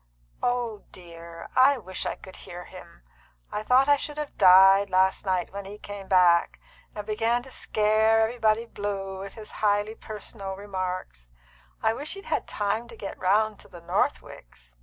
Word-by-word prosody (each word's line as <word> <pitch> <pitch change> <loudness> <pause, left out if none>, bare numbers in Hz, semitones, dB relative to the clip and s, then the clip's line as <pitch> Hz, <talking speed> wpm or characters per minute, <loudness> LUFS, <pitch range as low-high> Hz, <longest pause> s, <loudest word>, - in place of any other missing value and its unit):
"Oh 240 -4 -1
dear, 170 -2 -11
I 265 +2 +6
wish 185 -5 -5
I - - -2
could 190 - -13
hear 175 0 -9
him! - - -14 0.5
I 210 - -3
thought 255 +5 +4
I 290 0 +5
should 295 +1 -6
have 300 -1 -5
died 195 +1 +7
last 190 +1 +2
night 185 -1 -1
when 200 0 -6
he 200 +2 -9
came 205 -2 -9
back, 180 -2 +4 0.4
and 210 -1 -5
began 225 +3 0
to 265 - -13
scare 220 0 +2
everybody 225 0 +1
blue 195 -3 -5
with 195 0 -8
his 215 -1 -10
highly 205 0 +2
personal 210 -3 -7
remarks. 185 - -5 0.5
I 220 - +3
wish 290 +9 -5
he'd 395 - -10
had - - -2
time 210 +3 -2
to - - -12
get 200 - -6
round 210 +3 +2
to - - -14
the 175 - -12
Northwicks." - - -3
205 Hz, 170 wpm, -26 LUFS, 185-225 Hz, 0.5 s, died